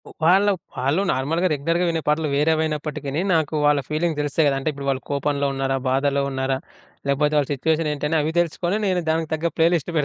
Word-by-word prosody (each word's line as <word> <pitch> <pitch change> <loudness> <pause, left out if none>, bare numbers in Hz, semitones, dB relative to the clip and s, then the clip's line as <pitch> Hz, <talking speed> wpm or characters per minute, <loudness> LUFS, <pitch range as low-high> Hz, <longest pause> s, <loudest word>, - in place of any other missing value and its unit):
ఉ - - -11
వాళ్ళు 195 +5 +5 0.2
వాళ్ళు 140 +8 +1
నార్మల్‌గా 160 +8 0
రెగ్యులర్‌గా 165 +5 0
వినే 165 -1 -1
పాటలు 150 +1 +1
వేరేవైనప్పటికీని, 150 -1 0
నాకు 160 -1 +1
వాళ్ళ 145 -1 +4
ఫీలింగ్స్ 155 0 -1
తెలుస్తాయి 145 +1 +1
కద 140 - +2
అంటే, 135 - -1
ఇప్పుడు 140 -1 -6
వాళ్ళు 135 -1 -1
కోపంలో 140 0 0
ఉన్నారా? 135 0 -1
బాధలో 140 +1 +1
ఉన్నారా? 130 0 -1 0.5
లేకపోతే 150 +2 +1
వాళ్ళ 145 -2 +1
సిట్యుయేషన్ 155 +3 0
ఏంటి? 150 0 -2
అని 160 - +2
అవి 155 +2 -2
తెలుసుకొని 175 +4 -1
నేను 185 -2 +1
దానికి 160 -1 -2
తగ్గ 165 +2 -2
ప్లే 165 0 +5
లిస్ట్ 170 0 -1
150 Hz, 190 wpm, -22 LUFS, 140-165 Hz, 0.5 s, వాళ్ళు